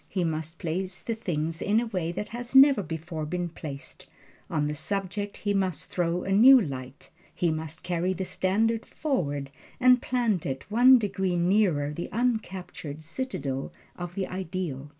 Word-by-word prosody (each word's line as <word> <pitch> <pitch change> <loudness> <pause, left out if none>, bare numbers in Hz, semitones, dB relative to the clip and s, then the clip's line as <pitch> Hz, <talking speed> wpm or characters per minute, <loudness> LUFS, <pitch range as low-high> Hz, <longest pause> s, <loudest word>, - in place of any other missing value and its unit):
He 185 -2 -1
must 160 0 -3
place 180 +2 -3
the 230 - -3
thing 165 -8 -2
in 210 +2 +3
a 240 - -1
way 185 -7 -2
it 185 +4 -4
has 240 +2 -6
never 270 -4 +8
before 160 -1 -5
been 175 +3 -2
placed; 145 -4 -8 0.4
on 150 -2 0
the 150 - -1
subject 195 +5 -3
he 205 -1 -1
must 190 -5 -1
throw 175 0 0
a 195 - -3
new 250 +7 +8
light; 135 - -6 0.2
he 170 -2 +1
must 160 0 -5
carry 180 +1 0
the 190 0 -3
standard 215 +5 +1
forward, 145 - -2 0.3
and 250 -1 +6
plant 235 -8 0
it 135 -1 -4
one 250 +4 +7
degree 195 -5 -1
nearer 175 -5 +2
the 170 - -5
uncaptured 190 -10 -3
citadel 150 - -4 0.2
of 175 0 -7
the 195 - -1
Ideal. 175 -6 -4
180 Hz, 165 wpm, -27 LUFS, 160-210 Hz, 0.4 s, never